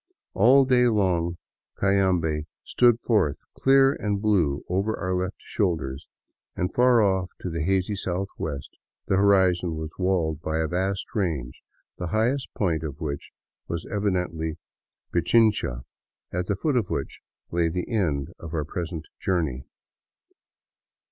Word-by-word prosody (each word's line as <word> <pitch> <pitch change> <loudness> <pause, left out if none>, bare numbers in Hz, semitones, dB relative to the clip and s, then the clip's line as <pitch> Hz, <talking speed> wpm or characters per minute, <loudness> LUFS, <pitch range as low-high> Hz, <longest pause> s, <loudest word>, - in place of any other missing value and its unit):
All 130 +7 +6
day 125 -1 +4
long 90 -6 +1 0.4
Cayambe 90 -6 +1 0.2
stood 120 -2 +3
forth 100 - +2 0.2
clear 135 0 +5
and 105 -5 -2
blue 90 -10 +1
over 100 +4 0
our 95 -1 -2
left 90 +2 -1
shoulders, 80 - -2 0.5
and 90 +1 -2
far 125 -2 +5
off 95 -2 +1
to 90 - -4
the 85 -1 -2
hazy 95 +4 +1
southwest 90 -7 -4 0.3
the 95 - +1
horizon 95 -4 +3
was 80 0 -5
walled 85 -5 0
by 80 -1 -2
a 80 - +1
vast 95 +3 -1
range, 80 - -2 0.4
the 90 - -3
highest 120 +8 0
point 85 -7 0
of 75 -1 -6
which 70 -4 -4 0.4
was 85 0 -4
evidently 90 -6 -1 0.6
Pichincha, 90 - +2 0.5
at 90 0 -2
the 100 - +1
foot 140 - 0
of 110 -6 0
which - - -4 0.3
lay 85 -1 +2
the 90 +2 -3
end 75 - 0
of 85 0 -7
our 75 -2 -1
pres 85 +2 -4
ent 80 -2 -6
journey. 80 -9 -1
90 Hz, 140 wpm, -25 LUFS, 80-100 Hz, 0.6 s, All